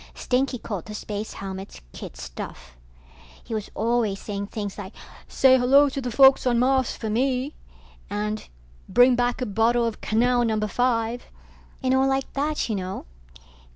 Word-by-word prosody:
Stinky 255 +1 0
called 200 -7 -5
the 210 - -7
space 210 0 -5
helmets 195 0 -7
kid - - -9
stuff. 60 +1 -8 0.7
He - - -7
was 215 -2 -3
always 225 -3 0
saying 200 -1 -5
things 205 -2 -5
like 205 -1 -8 0.3
say 260 -1 +5
hello 275 +4 +5
to 275 0 -4
the 250 - -3
folks 265 +2 +6
on 240 -1 +3
Mars 260 +1 +2
for 220 - -5
me, 255 +5 0 0.6
and 210 +1 -3 0.4
bring 245 0 +6
back 245 +1 0
a - - -1
bottle 230 +3 +2
of 230 -2 -4
canal 240 +3 +2
number 215 -2 0
five, 235 +1 0 0.6
and 260 0 +2
all 265 +1 +3
like 270 0 -1
that, 295 +2 -1
you 225 - -2
know. 190 -1 -4
235 Hz, 160 wpm, -24 LUFS, 210-255 Hz, 0.7 s, folks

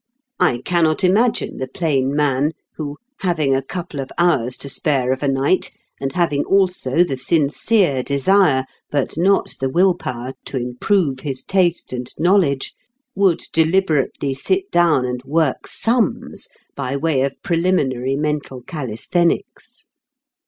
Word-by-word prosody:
I 130 -9 +2
cannot 170 -1 +2
imagine 215 +6 +2
the 130 - -3
plain 135 -2 0
man 145 +1 +1 0.2
who, 145 -2 -5 0.2
having 160 -7 +1
a 135 - +1
couple 165 +1 -6
of 135 - -4
hours 135 -8 +2
to - - -4
spare 135 -1 0
of 130 - -6
a 145 - 0
night, 135 +7 +1 0.3
and 135 0 -3
having 165 -5 +1
also 180 -6 +2
the 155 -7 -2
sincere 150 - +1
desire 140 0 +3 0.2
but 140 -3 -1
not 190 +5 +2
the 135 - 0
will 180 +6 +4
power 125 -3 -6
to 135 - -4
improve 130 +4 0
his 130 -2 -5
taste 180 -7 0
and 125 0 -5
knowledge, 165 -5 +2 0.4
would 195 -5 +2
deliberately 160 -5 +1
sit 375 - -1
down 165 -7 +3
and 125 0 -4
work 145 0 0
sums 230 -4 -1 0.3
by 130 +2 -2
way 150 -2 +1
of 135 0 -2
preliminary 145 -8 +1
mental 145 -3 -3
calisthenics. 155 +4 -2
150 Hz, 140 wpm, -20 LUFS, 130-175 Hz, 0.4 s, will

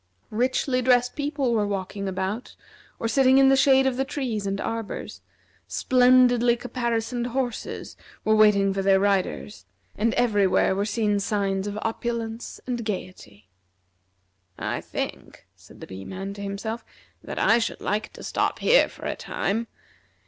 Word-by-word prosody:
Richly 255 +3 +1
dressed 245 0 +3
people 285 -4 -1
were 210 -2 +1
walking 195 0 -4
about 190 +5 -3 0.4
or 230 - -2
sitting 260 +2 +4
in 270 0 +6
the 270 - +6
shade 265 0 +5
of 260 -2 0
the 270 - +1
trees 250 -7 -3
and 195 0 -2
arbors; 225 -1 -5 0.5
splendidly 245 -1 +4
caparisoned 240 -1 -2
horses 245 -1 -4 0.3
were 220 - +4
waiting 200 -2 +4
for 195 - -1
their 195 0 +4
riders; 185 - -1 0.3
and 225 +2 0
everywhere 205 -5 +3
were 200 +1 0
seen 210 -1 +1
signs 200 -1 -1
of 205 0 -4
opulence 230 0 -4
and 240 -2 -3
gayety. 180 - -7 1.1
"I - - -3
think," - - -6
said - - -17
the - - -6
Bee 95 +1 -9
man 195 - -6
to 200 - -9
himself, 205 +3 -4 0.4
"that - - -7
I 230 - +4
should 230 - -2
like 210 +1 -2
to - - -11
stop - - -1
here - - +4
for - - -11
a - - -2
time. 225 +4 -2
225 Hz, 150 wpm, -25 LUFS, 200-245 Hz, 1.1 s, in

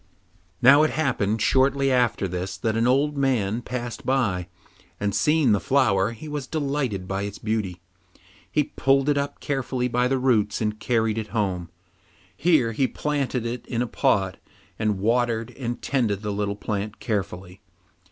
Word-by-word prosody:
Now 140 +4 +8
it 155 - +3
happened 115 -8 0
shortly 135 +1 +3
after 120 -6 +2
this 95 +2 -4
that 110 +1 -1
an 115 +1 +2
old 140 +4 +2
man 120 -6 +1
passed 120 -2 -5
by, 100 -10 0 0.5
and 100 0 -1
seeing 150 -2 +3
the 100 - +3
flower, 105 -8 +2
he 115 +7 -10
was 145 -3 -4
delighted 135 - -2
with 95 +1 -2
its 100 0 -5
beauty. 105 -5 -2 0.7
He 150 - +3
pulled 135 +1 +1
it 145 - +2
up 140 0 -4
carefully 130 -3 -1
by 125 0 +1
the 135 +1 +1
roots 115 -5 +2
and 105 -1 -2
carried 110 -1 +1
it 110 - -5
home. 90 -5 -1 0.7
Here 150 - +3
he 130 +4 +1
planted 140 -5 -2
it 120 +1 -4
in 120 0 -1
a - - -3
pot, 95 -4 +1 0.4
and 105 -2 +1
watered 115 +2 0
and 120 -2 -4
tended 110 -7 0
the 105 -1 -2
little 100 0 -1
plant 105 0 -4
carefully. 95 -3 -4
115 Hz, 160 wpm, -24 LUFS, 100-135 Hz, 0.7 s, Now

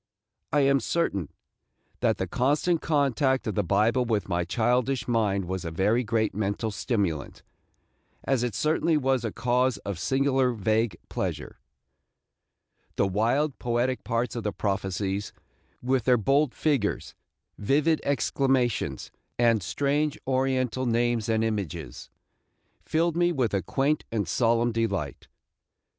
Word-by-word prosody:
I 145 - +3
am 140 0 +4
certain 110 - -1 0.7
that - - +1
the - - -1
constant 150 +6 +1
contact 140 -3 +1
of 110 - -2
the 105 - +1
Bible 105 +7 +2
with 110 -4 -1
my 90 -2 0
childish 125 +6 0
mind 105 -5 +1
was 95 0 -4
a 85 - -3
very 105 +9 +1
great 110 -1 0
mental 105 +2 -2
stimulant, 100 - -2 0.8
as 135 -3 +1
it 120 -4 -2
certainly 155 - +2
was 135 -3 +1
a 115 - -2
cause 125 0 +1
of 100 -3 -3
a - - -10
singular 135 +3 +1
vague 110 -2 0
pleasure. - - -4 1.4
The - - +2
wild, 120 +9 0
poetic 120 +1 -1
parts 115 +1 -1
of 120 - -2
the 105 - -1
prophecies, 95 0 -2 0.5
with 130 -2 +1
their 125 -1 +5
bold 135 +4 +2
figures, 140 -10 0 0.5
vivid 150 +8 +2
exclamations, 135 -4 0 0.3
and 115 -3 +3
strange 145 - 0
Oriental 130 -1 0
names 120 -1 +1
and 110 0 +2
images, 100 - -4 0.7
filled 165 +1 0
me 175 0 +3
with 130 -10 0
a 100 - +1
quaint 140 - 0
and 105 -5 -1
solemn 115 +4 +2
delight. 100 - -2
120 Hz, 135 wpm, -26 LUFS, 105-135 Hz, 1.4 s, their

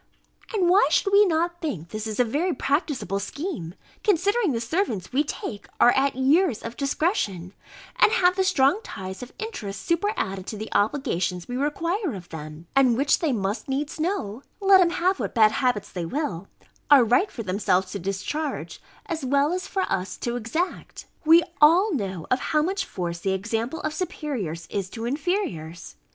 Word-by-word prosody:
And 395 -6 +1
why 365 -3 +5
should 390 +5 +1
we 410 0 +7
not 345 +1 0
think 180 - -4
this 215 +2 -4
a - - +6
very 300 +9 -1
practicable 265 - -1
scheme, 230 - -5 0.3
considering 405 +1 +2
the 235 - -1
servants 230 - -2
we 285 +3 +3
take 215 -7 -6
are 240 - +7
at 270 +1 +1
years 275 - +2
of 230 +1 -6
discretion, 255 - -1 0.4
and - - +5
have 365 -5 +4
the 380 - +2
strong 365 -2 +3
ties 190 - -7
of 250 - -8
interest 215 - -6
superadded 335 - -1
to 215 - -5
the 215 +1 -6
obligations 195 - 0
we 245 - -4
require 330 - -1
of 180 -2 -10
them? 155 0 -8
and 255 -4 +4
which, 280 +2 +3
they 320 -4 +1
must 205 +1 -2
needs 285 +4 -2
know 290 - -2 0.2
(let 390 -1 +6
'em 350 - +4
have 370 +2 0
what - - -3
bad 215 -2 +6
habits 245 -6 0
they 175 -3 -4
will) 200 - -3 0.4
are 285 -4 +8
right 250 - +3
for 230 - -6
themselves 185 -1 0
to 200 - -4
discharge, 195 - -4 0.2
as 325 -4 -4
well 280 +4 +2
as 365 +1 -3
for 385 - -1
us 185 - -2
to 240 0 -3
exact. 245 - -3 0.2
We 330 +2 +7 0.2
all 350 +7 +6
know 190 - -3
of 255 - +3
how 305 -1 +1
much 385 +3 -1
force 170 -2 -4
the 190 +2 0
example 225 +9 -2
of 310 - -2
superiors 255 - -4
is 195 -2 -2
to 225 +2 -6
inferiors. 245 - -3
265 Hz, 175 wpm, -25 LUFS, -, 0.4 s, are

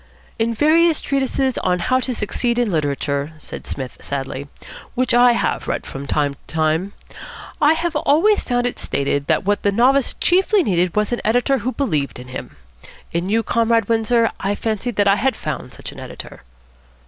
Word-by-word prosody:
"In 230 +1 0
various 320 +4 +4
treatises 270 -1 0
on 180 - +1
'How 255 +9 +1
to 255 -1 -3
Succeed 235 +3 -1
in 240 -4 +1
Literature,'" 145 -1 -1
said 155 - -9
Psmith 130 -2 -6
sadly, 140 0 -4 0.5
"which 255 +1 +1
I 245 0 +6
have 235 - -1
read - - -2
from 140 +1 -7
time 145 -1 +1
to 140 - -21
time, 160 +5 0 0.7
I 300 +1 +6
have 335 0 -2
always 330 +9 +3
found 245 0 -1
it 245 - -2
stated 140 0 -1
that - - +1
what 205 +1 +1
the 200 - +2
novice 255 +5 +3
chiefly 380 +2 +3
needed 180 - +1
was 210 +1 +1
an 240 - -1
editor 245 +5 +2
who 245 +4 -2
believed 155 - -1
in 125 +1 -10
him. 130 - -7 0.6
In 170 +3 -2
you, 225 +2 +2
Comrade 230 -2 +2
Windsor, 230 0 +2
I 200 +1 -1
fancied 225 +2 -2
that 205 -1 +3
I 195 +1 +5
had 260 +6 +1
found - - -5
such - - -8
an - - -11
editor." - - -9
225 Hz, 185 wpm, -20 LUFS, 165-255 Hz, 0.7 s, I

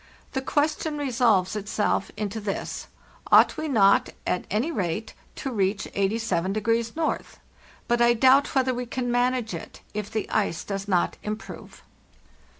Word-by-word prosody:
The 265 - -2
question 300 +2 0
resolves 230 -9 +2
itself 205 -1 -1
into 210 +1 -3
this: 200 -1 -4 0.4
Ought - - +7
we 315 - -3
not, 205 -8 +4 0.2
at 180 - -1
any 230 - 0
rate, 200 - -2 0.2
to 270 - -4
reach 195 -2 0
87° 215 - 0 0.2
N.? - - -18 0.6
But 240 0 +2
I 240 0 +5
doubt 265 +4 +4
whether 260 -1 +2
we 245 0 -4
can 245 0 -2
manage 245 -3 +1
it 165 - -8
if 210 -1 -4
the 220 - -3
ice 200 -5 0
does 195 0 -4
not 180 -3 +1
improve. 215 +1 -7
220 Hz, 145 wpm, -25 LUFS, 200-250 Hz, 0.6 s, Ought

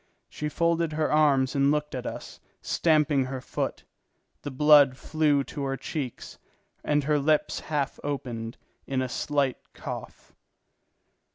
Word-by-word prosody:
She 150 - -4
folded 170 0 +1
her 155 0 0
arms 140 -4 +3
and 140 0 +3
looked 150 0 0
at 125 -2 -4
us, - - -7 0.2
stamping 150 -4 +2
her 130 0 -5
foot. - - -4 0.6
The - - -5
blood 145 -1 +6
flew 150 -2 +1
to 145 - -7
her 135 0 -2
cheeks, 135 -2 -6 0.4
and 150 -1 +1
her 150 +1 +2
lips 150 +2 +1
half 145 -3 -2
opened 120 -5 -4 0.3
in 130 -1 0
a - - -2
slight 140 +2 -1 0.2
cough. - - -8
145 Hz, 140 wpm, -27 LUFS, 135-150 Hz, 0.6 s, blood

